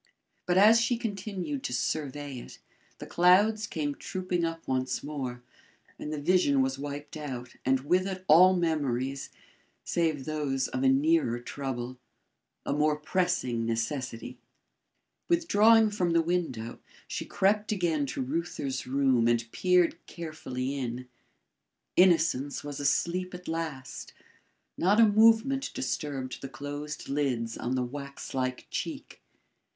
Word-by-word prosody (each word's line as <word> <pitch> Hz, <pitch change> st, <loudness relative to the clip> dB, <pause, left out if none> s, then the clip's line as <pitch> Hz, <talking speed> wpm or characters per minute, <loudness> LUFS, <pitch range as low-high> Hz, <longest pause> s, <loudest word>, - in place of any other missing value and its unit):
But 180 Hz, 0 st, +2 dB
as 220 Hz, +4 st, +7 dB
she 230 Hz, +1 st, +1 dB
continued 195 Hz, -, -4 dB
to 125 Hz, -, -4 dB
survey 145 Hz, +1 st, -3 dB
it, -, -, -11 dB, 0.4 s
the -, -, -8 dB
clouds 205 Hz, +5 st, +4 dB
came 145 Hz, -5 st, -2 dB
trooping 180 Hz, +2 st, -3 dB
up 165 Hz, 0 st, -3 dB
once 130 Hz, 0 st, -1 dB
more, 130 Hz, -4 st, -5 dB, 0.6 s
and 150 Hz, -, -5 dB
the 155 Hz, -, -3 dB
vision 145 Hz, -4 st, +3 dB
was 135 Hz, +1 st, -2 dB
wiped 145 Hz, +1 st, -6 dB
out 130 Hz, -5 st, -6 dB
and 130 Hz, 0 st, +2 dB
with 180 Hz, +7 st, +1 dB
it 185 Hz, -1 st, -5 dB
all 185 Hz, +4 st, +7 dB
memories 140 Hz, -6 st, -1 dB, 0.5 s
save 160 Hz, -5 st, 0 dB
those 145 Hz, -4 st, -1 dB
of 130 Hz, -, -3 dB
a 135 Hz, -, +4 dB
nearer 140 Hz, -2 st, +3 dB
trouble 130 Hz, -1 st, -5 dB, 0.7 s
a -, -, 0 dB
more 150 Hz, +1 st, +2 dB
pressing 150 Hz, -7 st, 0 dB
necessity. 120 Hz, +1 st, -3 dB, 0.9 s
Withdrawing 225 Hz, -10 st, +5 dB
from 180 Hz, -5 st, 0 dB
the 165 Hz, 0 st, +4 dB
window, 160 Hz, -10 st, -2 dB, 0.3 s
she -, -, -4 dB
crept 210 Hz, +3 st, +1 dB
again 165 Hz, -8 st, 0 dB
to 130 Hz, -, -3 dB
Reuther's 140 Hz, -2 st, -3 dB
room 130 Hz, -3 st, +2 dB
and 120 Hz, 0 st, +1 dB
peered 180 Hz, -2 st, +2 dB
carefully 140 Hz, -6 st, -5 dB
in. 125 Hz, 0 st, -4 dB, 0.9 s
Innocence 165 Hz, -6 st, +3 dB
was 145 Hz, -1 st, -6 dB
asleep 180 Hz, +6 st, 0 dB
at 180 Hz, 0 st, -11 dB
last. 160 Hz, -5 st, -5 dB, 0.7 s
Not 200 Hz, +5 st, +3 dB
a 230 Hz, -, +8 dB
movement 225 Hz, +5 st, +4 dB
disturbed 140 Hz, -, -3 dB
the 135 Hz, -, -6 dB
closed 145 Hz, +3 st, -6 dB
lids 125 Hz, -5 st, -1 dB
on 125 Hz, +2 st, -2 dB
the 130 Hz, -, 0 dB
wax 140 Hz, +2 st, -7 dB
like 130 Hz, -1 st, -2 dB
cheek. -, -, -5 dB
150 Hz, 135 wpm, -29 LUFS, 130-180 Hz, 0.9 s, a